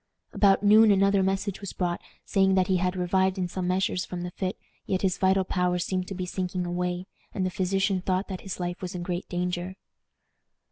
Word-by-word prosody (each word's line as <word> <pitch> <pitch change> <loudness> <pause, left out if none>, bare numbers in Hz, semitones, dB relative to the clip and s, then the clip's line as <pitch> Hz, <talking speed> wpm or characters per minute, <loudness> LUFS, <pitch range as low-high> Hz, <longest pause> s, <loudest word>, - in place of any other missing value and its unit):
About 200 -1 +4
noon 215 +2 +7
another 195 0 +4
message 195 +1 -1
was 200 - -6
brought, 175 -1 -2 0.2
saying 190 -1 +3
that 185 -1 +3
he 190 -1 +2
had 180 +1 0
revived 190 +1 +1
in 180 -1 -1
some 180 0 -3
measure 185 +1 +1
from 180 -1 -4
the 180 - -5
fit, 185 +1 -3 0.3
yet 190 0 -1
his 185 -2 +1
vital 190 0 +3
powers 180 -1 0
seemed 185 -1 -2
to 195 - -5
be 185 0 -3
sinking 180 0 -3
away, 180 +1 -2 0.3
and 185 - 0
the 185 - -1
physician 190 0 0
thought 185 +1 0
that 190 -2 -6
his 190 -2 -6
life 175 0 -3
was 180 -1 -5
in 175 - -4
great 175 +1 -4
danger. 180 +1 -2
185 Hz, 205 wpm, -27 LUFS, 180-195 Hz, 0.3 s, noon